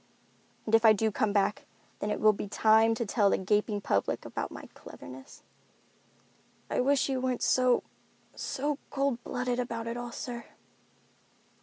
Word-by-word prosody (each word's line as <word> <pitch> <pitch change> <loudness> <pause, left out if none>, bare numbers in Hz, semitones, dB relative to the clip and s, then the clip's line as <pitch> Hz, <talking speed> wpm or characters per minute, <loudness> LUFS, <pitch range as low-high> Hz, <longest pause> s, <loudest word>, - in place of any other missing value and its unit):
And 220 - -4
if 225 0 +6
I 220 -1 +8
do 220 +1 0
come 210 +1 0
back, 205 0 0 0.3
then 205 - -2
it - - -1
will 215 0 +5
be 205 - -5
time 220 +2 +4
to 235 - -2
tell 205 -1 +2
the - - +2
gaping 205 +2 0
public 100 - -1
about - - -4
my - - -10
cleverness." 130 +1 -12 1.3
"I - - 0
wish 275 +1 +2
you 265 -2 -1
weren't 255 -1 -1
so—so 260 +2 -1
cold 275 -4 -1
blooded 250 0 -2
about 230 -2 -3
it 230 +1 -4
all, 240 0 -5
sir." 240 -1 -6
230 Hz, 155 wpm, -29 LUFS, 210-250 Hz, 1.3 s, I